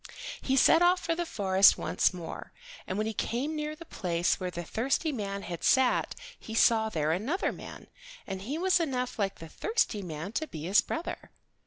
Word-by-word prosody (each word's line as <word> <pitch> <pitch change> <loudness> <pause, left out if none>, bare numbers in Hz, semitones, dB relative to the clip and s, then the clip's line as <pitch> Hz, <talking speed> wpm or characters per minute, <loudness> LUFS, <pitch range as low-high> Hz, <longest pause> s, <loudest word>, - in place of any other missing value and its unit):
He 265 - 0
set 325 +5 +6
off 355 +1 +5
for 335 -1 -1
the 345 0 -3
forest 190 -4 +5
once - - +1
more, 180 -3 -8 0.3
and 185 - -3
when 215 - 0
he 220 - -2
came 260 +9 -2
near 300 0 -3
the 335 - -12
place 175 - -1
where 185 -1 -3
the 175 -1 -5
thirsty 270 - -1
man 200 -5 -4
had 170 -2 -6
sat 260 -1 +3 0.2
he 220 - -8
saw 225 -1 +4
there 155 -5 0
another 245 - 0
man, - - -10 0.4
and 190 -1 -5
he 265 +10 -4
was 370 +1 +3
enough 255 -7 -2
like 195 -2 -1
the 165 - -9
thirsty 245 - -1
man 165 +1 -6
to 315 +8 -2
be 155 - -8
his 190 +5 +4
brother. 330 - -5
220 Hz, 195 wpm, -29 LUFS, 185-310 Hz, 0.4 s, set